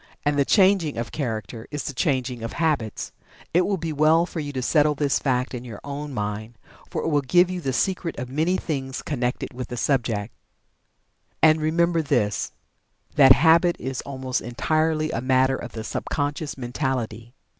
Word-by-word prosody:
And 145 0 +2
the 140 -1 +3
changing 190 - +3
of 115 - -3
Character 110 -5 -4
is 145 -1 -4
the 140 - -4
changing 130 -3 -1
of 115 - -5
Habits. 150 -10 -1 0.4
It 180 +2 +3
will 200 -1 0
be 165 -2 -3
well 155 +3 +4
for 175 - -6
you 145 -2 -4
to 130 - -2
settle 150 +1 +3
this 145 -1 +1
fact 125 -2 0
in 125 -1 -5
your 115 -5 -8
own 145 +1 -5
mind, 105 0 -4 0.3
for - - -3
it - - 0
will 145 -2 +2
give 175 +7 +3
you 180 -1 -4
the 135 - -1
secret 175 +4 -1
of 125 - -4
many 160 +8 +1
things 135 -6 -4
connected 125 -4 -2
with 125 0 -5
the 125 - -6
subject. 115 -6 0 1.1
And, 155 0 +6
remember 165 +2 +2
this, 105 -9 0 0.6
that 135 -3 +8
Habit 165 +5 +4
is 130 -1 -4
almost 130 -2 -3
entirely 155 +5 0
a 115 - -2
matter 130 +1 +3
of - - -7
the 110 - -5
sub - - -4
conscious 145 0 -2
mentality. 120 -2 -3
140 Hz, 180 wpm, -24 LUFS, 125-155 Hz, 1.1 s, that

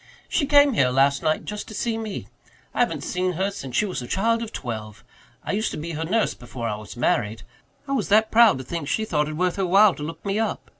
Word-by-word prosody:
"She 285 - 0
came 285 -1 +6
here 130 - +3
last 135 +2 +3
night 155 0 0
just 210 0 -5
to 215 - -9
see 230 +1 -1
me. 220 -3 -5 0.5
I - - -4
haven't 165 - +1
seen 180 0 -1
her 190 +4 -1
since 135 -10 -7
she 210 - +3
was 185 -9 -4
a 125 - -7
child 230 - +1
of 225 -1 -5
twelve. 110 -3 -6 0.4
I - - -3
used 215 +2 0
to - - -6
be 165 +2 -5
her 160 0 -3
nurse 220 +6 +1
before 120 -1 -6
I 105 - -1
was 105 +2 -10
married. 110 -2 0 0.4
I - - -5
was 260 -7 0
that 215 +2 +4
proud 230 - +6
to 130 - -6
think 160 +2 -5
she 220 - 0
thought 150 -6 0
it 155 - -5
worth 180 +1 0
her 195 - +1
while 195 +2 +6
to - - -10
look 160 +6 -7
me 200 +2 0
up. 225 - -2
180 Hz, 255 wpm, -24 LUFS, 135-220 Hz, 0.5 s, came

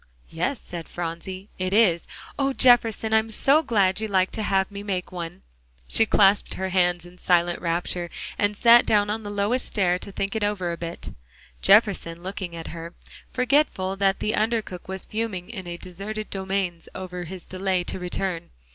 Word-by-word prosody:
"Yes," 180 +12 -1
said 170 -2 -8
Phronsie, 175 +3 -6
"it 185 +1 -1
is. 185 -7 +3 0.3
Oh, 275 -1 +1
Jefferson, 230 -4 +4
I'm 220 0 +3
so 275 +7 +3
glad 200 -9 +2
you 220 - -1
like 190 -2 +2
to 220 - -4
have 195 -1 +1
me 200 0 -6
make 190 -3 -3
one," 175 0 -7 0.4
she 225 - +3
clasped 200 0 +4
her 190 0 -3
hands 175 -2 +1
in 180 +1 -15
silent 175 -1 +2
rapture, 175 0 -1 0.3
and 205 0 0
sat 235 +1 +7
down 205 -1 +3
on 220 +1 -2
the 205 - -7
lowest 205 +5 0
stair 180 -3 +1
to 200 - -7
think 195 +2 -3
it 220 - -1
over 200 -4 -1
a - - -3
bit, 170 0 -6 0.5
Jefferson 195 -5 +3
looking 185 -2 -5
at 165 - -7
her, 170 +1 -8 0.4
forgetful 250 -7 +1
that 195 0 +2
the 215 - 0
under 225 0 +1
cook 180 -3 -9
was 190 0 +1
fuming 215 -3 -4
in 190 -6 -7
the 175 0 -6
deserted 200 +5 -6
domains 190 -3 -2
over 180 -1 -6
his 180 +1 -8
delay 185 -1 -1
to 180 - -4
return. 180 -1 -3
190 Hz, 180 wpm, -24 LUFS, 175-215 Hz, 0.5 s, sat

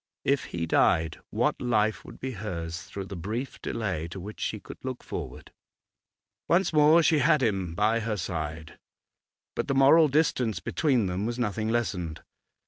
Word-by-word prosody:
If 140 -1 +2
he 85 -1 -3
died, 80 0 +2
what - - 0
life 110 -3 +1
would - - -12
be 130 - -4
hers 90 -6 -5
through 100 0 -7
the 100 - -7
brief 110 +10 -5
delay 95 -8 -2
to 90 +3 -8
which 105 +4 -8
she 110 - -2
could - - -11
look 130 -1 -5
forward? - - -7 1.0
Once 175 +1 +2
more 155 +2 +6
she 160 -1 +4
had 150 -2 +4
him 95 -7 0
by 110 +4 +2
her 110 -1 -2
side, 80 -3 -5 0.8
but - - -2
the 140 - 0
moral 150 +4 +7
distance 130 -6 +1
between 130 -9 +1
them 95 +3 -2
was 120 0 -3
nothing 110 -2 -1
lessened. 90 -9 -2
110 Hz, 165 wpm, -27 LUFS, 90-130 Hz, 1.0 s, moral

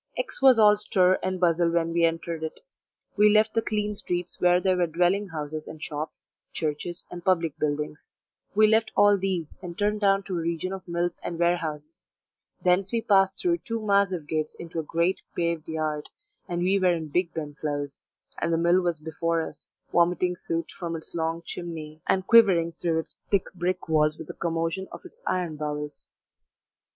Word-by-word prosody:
X - - -1
was 265 -3 +7
all 210 -1 +7
stir 190 -3 +2
and 185 0 -2
bustle 170 -1 +3
when 165 0 0
we 170 0 +4
entered 165 0 -2
it; 160 0 -5 0.6
we 210 +1 +6
left 215 +1 +4
the 225 - +2
clean 210 -1 -1
streets 180 -3 -4
where 180 0 +5
there 185 0 +2
were 175 -1 +2
dwelling 180 +5 +1
houses 155 -2 -5
and 155 - -9
shops, 150 +1 -6 0.3
churches, 160 +3 -3
and 175 -1 -7
public 170 -5 +1
buildings; 150 0 -2 0.5
we 215 +1 +6
left 220 +1 +3
all 205 0 +6
these, 185 -5 -2
and 175 -2 -7
turned 210 +1 0
down 195 -1 +3
to 190 -2 -4
a - - -2
region 170 +3 -2
of 190 -1 -8
mills 175 0 -1
and 170 - -4
warehouses; 165 -1 -2 0.6
thence 185 +2 +2
we 230 - 0
passed 195 -1 +3
through 345 -1 +1
two 230 0 -4
massive 195 -6 +2
gates 155 0 -2
into 165 -1 -6
a 155 - -6
great 170 +3 +1 0.2
paved 170 -2 -1
yard, 155 -2 -2 0.4
and 175 0 -1
we 195 +2 +3
were 185 -1 +4
in 160 -2 -4
Bigben 160 -3 -2
Close, 145 -2 -3 0.4
and 170 - 0
the 165 - +2
mill 170 +2 +4
was 175 -3 -1
before 165 +1 -1
us, - - -11 0.3
vomiting 180 +1 +2
soot 165 -1 -4
from 170 -2 -5
its 160 - -8
long 165 0 -2
chimney, 160 -3 -7
and 190 -1 +2
quivering 190 -8 +6
through 165 0 -1
its 160 - -4 0.2
thick 200 -3 0
brick 180 0 -2
walls 155 -1 +2
with 160 - -8
the - - -8
commotion 165 +3 -2
of - - -10
its 455 +7 -13
iron 175 -4 -1
bowels. 150 0 -5
170 Hz, 185 wpm, -26 LUFS, 160-190 Hz, 0.6 s, was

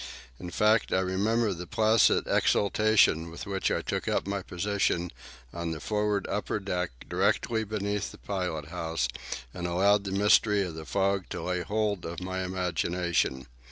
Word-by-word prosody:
In 90 - -6
fact, 105 +5 +2
I 95 - +3
remember 105 +4 +1
the 90 0 -7
placid 110 +3 +4
exaltation 100 -5 +3
with 85 - -8
which 95 -1 -1
I - - -1
took - - -3
up - - 0
my 100 0 -2
position 90 -2 -1 0.4
on 85 -1 -3
the 80 -1 -4
forward 105 0 0
upper 105 0 -2
deck, 90 -3 -2 0.2
directly 110 -1 +1
beneath 105 -1 -2
the - - -12
pilot 90 -7 -3
house, 80 -6 -2 0.5
and 90 -1 -4
allowed 100 +4 +3
the 95 - -3
mystery 105 +1 +4
of 90 -3 -5
the 80 0 -8
fog 100 0 0
to 85 - -5
lay 90 0 -1
hold 105 0 -1
of 85 0 -5
my 95 0 -3
imagination. 90 -6 -1
95 Hz, 160 wpm, -28 LUFS, 85-105 Hz, 0.5 s, placid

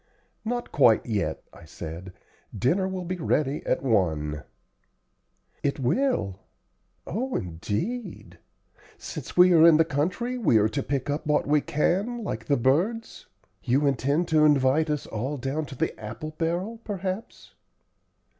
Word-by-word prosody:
"Not 240 +2 -3
quite 120 -6 +4
yet," 105 -4 -2
I - - -14
said; 85 +3 -8 0.4
"dinner 175 - +1
will 185 -1 -4
be 185 +1 -3
ready 150 -3 0
at - - 0
one." 80 - 0 1.2
"It 140 0 -1
will? 130 - 0 0.7
Oh, 255 +7 -3
indeed! 105 - -4 0.6
Since - - -8
we 180 0 +7
are 160 -2 +7
in 160 -2 +7
the 160 - +4
country 185 - -1
we 155 - +4
are 105 0 +3
to 140 +5 -2
pick 140 0 -2
up 150 +1 -3
what 150 -1 +2
we 150 +1 +3
can, 200 +12 0
like 115 - -4
the 140 - +2
birds. 175 - 0 0.3
You 135 +4 +1
intend 140 +5 +1
to 155 -1 +4
invite 145 +1 +3
us 150 -1 -1
all 130 +7 -3
down 140 +4 -3
to 135 - -9
the - - -1
apple 115 +9 -6
barrel, 175 +8 -2
perhaps." 195 +1 -5
150 Hz, 145 wpm, -26 LUFS, 120-185 Hz, 1.2 s, we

